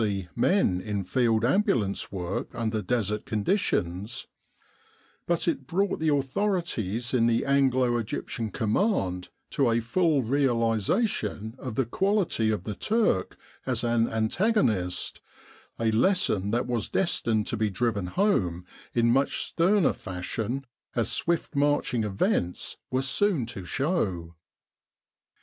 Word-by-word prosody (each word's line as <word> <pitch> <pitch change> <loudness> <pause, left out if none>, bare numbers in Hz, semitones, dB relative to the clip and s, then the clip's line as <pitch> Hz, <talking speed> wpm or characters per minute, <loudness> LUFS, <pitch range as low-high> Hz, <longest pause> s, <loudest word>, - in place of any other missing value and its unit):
C. 100 -4 -2
men 120 - +2
in 105 -2 -3
field 115 +3 +1
ambulance 125 - +1
work 95 +6 -4
under 110 -2 -1
desert 105 -1 -1
conditions, 105 - -1 1.0
but 170 0 0
it 135 -6 -1
brought 195 +6 0
the 160 0 +1
authorities 135 - -1
in 115 -2 +3
the 115 0 +1
Anglo 130 -3 +3
Egyptian 115 0 -3
Command 105 - 0 0.2
to 135 -4 +2
a 115 0 +2
full 150 +4 +1
realisation 115 - 0
of 125 -5 -5
the 135 - +1
quality 190 - +1
of 105 -4 -1
the 105 - -4
Turk 210 - 0 0.3
as - - 0
an 115 -1 +2
antagonist 110 - 0 0.6
a 115 -1 +2
lesson 110 - +2
that 120 +3 0
was 120 -3 -2
destined 115 - +1
to - - -2
be 110 -1 0
driven 105 -2 -1
home 90 - +1 0.3
in 120 -1 +3
much 135 +3 +1
sterner 185 +1 +2
fashion, 110 +8 -4 0.3
as - - +1
swift 170 -2 -1
marching 140 -5 +1
events 95 -3 -1
were 130 +1 0
soon 145 - +1
to 115 -5 -7
show. 95 - -1
115 Hz, 125 wpm, -27 LUFS, 105-145 Hz, 1.0 s, in